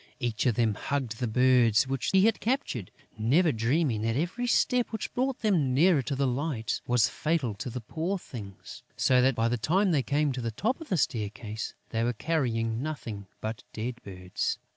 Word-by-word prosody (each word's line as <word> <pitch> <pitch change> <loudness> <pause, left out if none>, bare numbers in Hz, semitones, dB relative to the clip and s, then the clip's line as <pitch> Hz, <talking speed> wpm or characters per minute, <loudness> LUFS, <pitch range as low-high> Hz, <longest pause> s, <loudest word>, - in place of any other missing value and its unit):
Each 120 -2 -1
of 120 - +2
them 115 -2 +2
hugged 125 -1 -3
the 125 - 0
birds 125 -1 +4
which 135 -1 -1
he 190 +1 +5
had 225 - +2
captured, 225 - -1 0.3
never 150 +10 +3
dreaming 120 0 +1
that 115 +1 0
every 180 - -1
step 245 0 +2
which 220 -2 -4
brought 260 +1 -1
them 165 - +2
nearer 160 0 +5
to 135 +2 -3
the 140 +1 +1
light 125 -3 -1
was 120 -3 +4
fatal 150 -8 -1
to 125 +6 -6
the 125 +1 -5
poor 165 - -2
things, 105 - -10 0.2
so 125 -1 +4
that, 130 0 +3
by 115 0 +2
the 120 +1 0
time 185 - +2
they 150 -4 +3
came 145 +2 +1
to 125 -1 -4
the 115 - -2
top 225 - -1
of 320 - -9
the 185 - +1
staircase, 110 -4 -2
they 115 0 -1
were 120 +1 +1
carrying 115 -5 -1
nothing 115 -10 -5
but 110 +1 -4
dead 120 +3 -4
birds. 90 -2 -3
125 Hz, 195 wpm, -28 LUFS, 115-160 Hz, 0.3 s, he